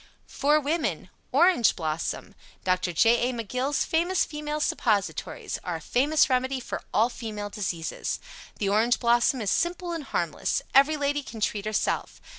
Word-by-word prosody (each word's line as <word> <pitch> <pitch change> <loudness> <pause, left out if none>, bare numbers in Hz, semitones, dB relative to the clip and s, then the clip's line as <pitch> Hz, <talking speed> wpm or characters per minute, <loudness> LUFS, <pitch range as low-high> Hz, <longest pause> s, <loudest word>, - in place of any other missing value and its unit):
FOR 295 +2 +2
WOMEN 305 +3 -2 0.2
ORANGE 350 - +4
BLOSSOM 160 -2 -3 0.3
Dr. 185 -1 +1
J. 235 +7 +3
A. - - -3
McGill's 255 +5 -1
Famous 345 +3 +1
Female 300 0 -4
Suppositories 210 -8 -1
Are - - -3
a - - -4
famous 290 +5 +2
remedy 260 +1 0
for 245 - -5
all 225 +3 +3
female 215 -4 -6
diseases. 175 -6 -3 0.4
The 200 - -1
Orange 220 +5 +3
Blossom 240 +1 +3
is 200 -2 0
simple 350 +1 0
and 325 -4 -4
harmless. - - -1
Every 285 +3 +5
lady 290 0 0
can 230 -5 -9
treat 210 -1 -1
herself. 215 -1 -1
250 Hz, 150 wpm, -26 LUFS, 210-295 Hz, 0.4 s, Every